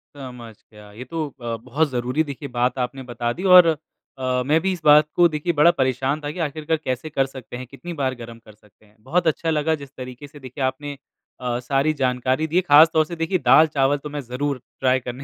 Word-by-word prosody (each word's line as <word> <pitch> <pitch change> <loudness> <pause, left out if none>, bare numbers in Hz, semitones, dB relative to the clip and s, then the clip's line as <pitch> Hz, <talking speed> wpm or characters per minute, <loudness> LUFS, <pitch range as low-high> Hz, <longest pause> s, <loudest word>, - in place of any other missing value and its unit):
समझ 125 -4 -10 0.2
गया। 105 -1 -15
ये 110 +5 -9
तो 160 +3 -4
अ, 120 -4 -6
बहुत 135 +7 -1
ज़रूरी 125 +4 -1
देखिए 140 -1 -7
बात 125 +1 0
आपने 125 +2 -3
बता 120 -1 -3
दी 180 - -8
और 180 -2 +8 0.5
अ, 130 -1 -1
मैं 155 +4 +3
भी 190 +1 0
इस 175 - -8
बात 150 0 +7
को 175 - +6
देखिए 155 +2 -2
बड़ा 160 +3 +5
परेशान 130 +3 0
था 145 - -4
कि 180 - -9
आखिरकार 155 0 -1
कैसे 130 +5 -3
कर 135 -2 +1
सकते 130 -2 -9
हैं, 130 - -7
कितनी 155 +7 -9
बार 135 -5 -2
गरम 115 -1 -10
कर 110 - -15
सकते 105 0 -26
हैं। 105 - -27
बहुत 175 +6 0
अच्छा 160 +1 0
लगा 160 +1 +1
जिस 140 - -10
तरीके 130 +2 -8
से 145 +1 -15
देखिए 130 +1 -6
आपने 140 +2 -3 0.4
अ, 125 -1 -2
सारी 135 +4 0
जानकारी 130 +2 0
दी, 175 +4 +2
खासतौर 160 0 +5
से 170 - -7
देखिए 165 +3 0
दाल 155 +4 +7
चावल 145 -1 +1
तो 150 +1 -8
मैं 145 0 -5
ज़रूर 130 +1 -3 0.2
ट्राई 130 0 +2
करने 125 +2 -7
135 Hz, 225 wpm, -22 LUFS, 125-155 Hz, 0.5 s, और